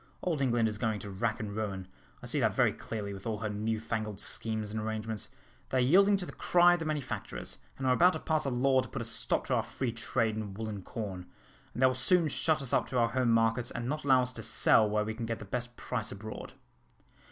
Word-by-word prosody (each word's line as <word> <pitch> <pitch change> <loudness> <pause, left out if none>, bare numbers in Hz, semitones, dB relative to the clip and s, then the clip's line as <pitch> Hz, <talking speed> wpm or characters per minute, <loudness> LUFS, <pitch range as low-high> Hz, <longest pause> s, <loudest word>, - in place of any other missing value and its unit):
Old 165 -6 0
England 120 -3 +2
is 105 -1 -4
going 110 -2 0
to 100 - -7
rack 110 +5 -1
and 105 -3 -5
ruin, 100 -4 -3 0.4
I - - -6
see - - 0
that - - +2
very - - +3
clearly, 105 -2 -5
with 95 +3 -8
all 110 -1 -1
her 110 0 -3
new 110 +2 -1
fangled 110 -2 -3
schemes 110 -1 -1
and 110 - -3
arrangements. 110 0 -4 0.4
They 130 - 0
are - - +4
yielding 195 +10 +5
to 185 - -3
the - - -8
cry 175 0 +4
of 175 - 0
the 165 - -4
manufacturers, 150 -3 -4 0.2
and 135 - -4
are 130 - +4
about 180 +7 +5
to - - -3
pass 155 -3 0
a - - +1
law 130 +1 +3
to 130 - -8
put 120 - -4
a - - -6
stop 115 - 0
to - - -1
our - - +3
free 130 -3 -3
trade 115 -1 0
in 105 -3 -5
wool 110 +2 -4
and 100 -3 -6
corn; 95 -6 -6 0.5
and 125 - 0
they - - +9
will 130 - +4
soon 160 +6 +3
shut 155 +1 +1
us 130 - -4
up - - +2
to 130 - -2
our 115 -1 +3
home 125 +1 +1
markets, 115 +1 +2
and 120 0 -4
not 150 +3 -2
allow 130 -2 +5
us 125 0 -3
to 115 - -7
sell 110 -1 +4
where 105 0 +1
we 110 - -3
can 115 0 -5
get 115 -1 -2
the 105 - -9
best 120 +3 -4
price - - -3
abroad." 110 +2 -8
115 Hz, 255 wpm, -31 LUFS, 110-130 Hz, 0.5 s, they